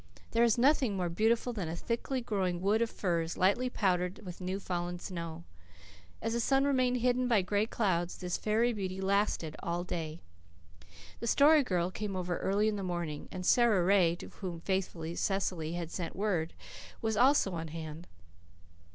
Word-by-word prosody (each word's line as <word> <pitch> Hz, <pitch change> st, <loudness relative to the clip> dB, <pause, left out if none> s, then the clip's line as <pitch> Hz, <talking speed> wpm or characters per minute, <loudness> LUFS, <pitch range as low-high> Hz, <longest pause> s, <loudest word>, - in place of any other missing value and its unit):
There 230 Hz, +1 st, +3 dB
is 235 Hz, -1 st, +4 dB
nothing 255 Hz, -5 st, +3 dB
more 180 Hz, -2 st, -1 dB
beautiful 225 Hz, +7 st, +1 dB
than 190 Hz, -8 st, -3 dB
a 165 Hz, -, -3 dB
thickly 235 Hz, +7 st, -2 dB
growing 190 Hz, -6 st, -1 dB
wood 205 Hz, +4 st, +2 dB
of 230 Hz, -, +1 dB
firs 170 Hz, -5 st, -1 dB
lightly 205 Hz, +7 st, +2 dB
powdered 180 Hz, -4 st, 0 dB
with 180 Hz, 0 st, -8 dB
new 185 Hz, +2 st, -2 dB
fallen 175 Hz, -2 st, -3 dB
snow. 170 Hz, -2 st, -6 dB, 0.8 s
As 225 Hz, +1 st, -1 dB
the 235 Hz, -, 0 dB
sun 270 Hz, +3 st, +3 dB
remained 255 Hz, -3 st, +2 dB
hidden 250 Hz, +1 st, +2 dB
by 220 Hz, -6 st, +3 dB
gray 205 Hz, +3 st, +1 dB
clouds, 180 Hz, -7 st, 0 dB
this 180 Hz, -1 st, -3 dB
fairy 225 Hz, +3 st, +1 dB
beauty 190 Hz, -3 st, -4 dB
lasted 195 Hz, -5 st, 0 dB
all 170 Hz, +1 st, -2 dB
day. 165 Hz, -2 st, -4 dB, 1.0 s
The 235 Hz, -, -4 dB
Story 295 Hz, +5 st, +6 dB
Girl 180 Hz, -6 st, 0 dB
came 205 Hz, 0 st, -4 dB
over 180 Hz, -1 st, -2 dB
early 205 Hz, +2 st, +1 dB
in 215 Hz, -1 st, 0 dB
the -, -, -3 dB
morning, 175 Hz, -5 st, -4 dB
and 185 Hz, -1 st, -5 dB
Sara 225 Hz, -6 st, +4 dB
Ray, 180 Hz, -3 st, +4 dB
to -, -, -10 dB
whom 175 Hz, -4 st, -6 dB
faithful 190 Hz, -3 st, -2 dB
Cecily 180 Hz, -5 st, -1 dB
had 170 Hz, -1 st, -4 dB
sent 175 Hz, -3 st, -4 dB
word, 185 Hz, -5 st, -1 dB, 0.5 s
was 220 Hz, -1 st, +1 dB
also 250 Hz, -3 st, +4 dB
on 165 Hz, -1 st, -4 dB
hand. 160 Hz, +1 st, -7 dB
190 Hz, 175 wpm, -31 LUFS, 175-225 Hz, 1.0 s, Story